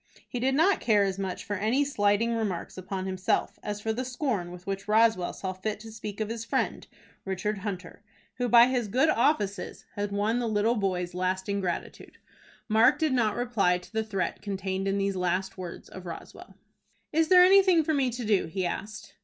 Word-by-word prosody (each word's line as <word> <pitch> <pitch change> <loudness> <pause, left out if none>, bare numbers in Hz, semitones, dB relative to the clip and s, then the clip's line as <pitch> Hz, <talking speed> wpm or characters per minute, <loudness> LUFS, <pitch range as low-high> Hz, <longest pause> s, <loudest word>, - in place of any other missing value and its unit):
He 245 - -4
did 265 +2 +1
not 350 +6 +4
care 210 -3 +3
as 195 -1 -2
much 190 -2 -4
for 205 - -3
any 230 +9 +1
slighting 215 -3 +1
remarks 205 -6 -3
upon 185 0 -5
himself, 185 0 -1
as 210 0 -4
for 220 +1 -1
the 250 +3 -2
scorn 245 - -2
with 180 +1 -11
which 195 0 -4
Roswell 215 -4 +3
saw 190 -1 -5
fit 205 +3 -4
to 225 0 -10
speak 210 -2 -7
of 215 - -1
his 230 0 -4
friend, 230 - -2 0.4
Richard 195 +2 -2
Hunter, 190 -3 -6 0.4
who 245 -1 0
by 235 0 +8
his 250 -3 0
good 255 +9 +2
offices 225 -7 0
had 205 0 -3
won 210 +4 0
the 240 - -1
little 215 +2 +2
boy's 185 -5 -1
lasting 190 +2 -1
gratitude. 175 -2 -5 0.5
Mark 225 +4 +5
did 310 -4 +1
not 225 -4 +2
reply 220 -7 +1
to 180 - -15
the 220 0 0
threat 195 -4 -3
contained 195 -1 -3
in 195 0 +1
these 195 0 0
last 185 +1 -1
words 180 -2 -8
of 185 -1 -10
Roswell. 170 - -10 0.6
"Is 320 +1 +3
there 360 +1 +8
anything 375 -3 +6
for 315 - 0
me 275 -3 +2
to 245 0 -5
do?" 205 -5 +2
he 185 +3 -2
asked. 200 +2 -5
205 Hz, 195 wpm, -28 LUFS, 190-240 Hz, 0.6 s, by